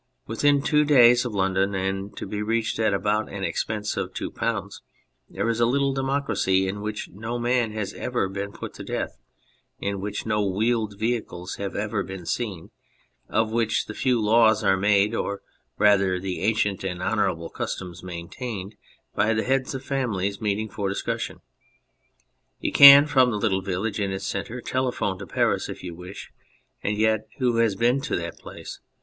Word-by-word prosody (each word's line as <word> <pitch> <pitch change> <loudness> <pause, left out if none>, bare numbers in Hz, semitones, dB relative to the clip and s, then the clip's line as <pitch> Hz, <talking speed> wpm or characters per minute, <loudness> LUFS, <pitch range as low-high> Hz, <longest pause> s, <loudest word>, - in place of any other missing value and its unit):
Within 140 +5 +2
two 150 0 +3
days 125 -4 +6
of 115 -4 -4
London, 95 +1 +1
and 95 +1 -3
to - - -5
be 105 0 -4
reached 110 +1 -1
at 110 -2 +3
about 105 +2 0
an 100 -1 -5
expense 105 +4 -2
of - - -3
2, - - -4 1.0
there - - -2
is 115 0 0
a 120 - +4
little 140 +2 +1
democracy 135 -8 +1
in 100 +2 -4
which 105 0 -4
no 110 +6 -5
man 120 -1 +1
has 110 -3 -3
ever - - -1
been 100 +1 -5
put - - -8
to - - -9
death, - - -4 0.6
in 100 -1 -3
which 105 +1 -4
no 105 -1 +1
wheeled 105 +1 0
vehicles 110 -5 -3
have 100 -1 -4
ever 105 0 -1
been 95 -2 -7
seen, 95 -4 -3 0.6
of 110 0 +1
which 115 -1 +1
the 105 - -7
few 125 +1 +1
laws 110 0 +4
are 95 - +4
made, 100 +2 +3
or 100 -3 -3 0.3
rather 100 -3 +4
the 95 -1 -4
ancient 105 -2 +1
and 90 -2 -3
honourable 85 -2 0
customs 90 -2 -5
main 85 -2 -7
tained, 105 -6 -6 0.4
by 105 +2 +2
the 110 - 0
heads 135 +1 0
of 130 - -5
families 100 -8 -1
meeting 105 0 -1
for 100 -1 -3
discussion. 100 - -3 1.2
You - - -2
can 140 +1 +10
from 130 -4 +4
the 110 - -1
little 100 -3 +1
village 100 +4 -2
in 100 -1 -1
its 95 0 -4
centre 125 +2 -4
telephone 125 -8 -1
to 100 - -8
Paris - - 0
if - - -7
you 90 -2 -6
wish, 90 +3 -10 0.5
and 105 +1 -1
yet 110 0 +1
who 125 -3 +1
has 115 -4 +3
been 120 +6 +2
to - - -2
that 85 -1 -5
place - - -9
105 Hz, 180 wpm, -25 LUFS, 95-120 Hz, 1.2 s, can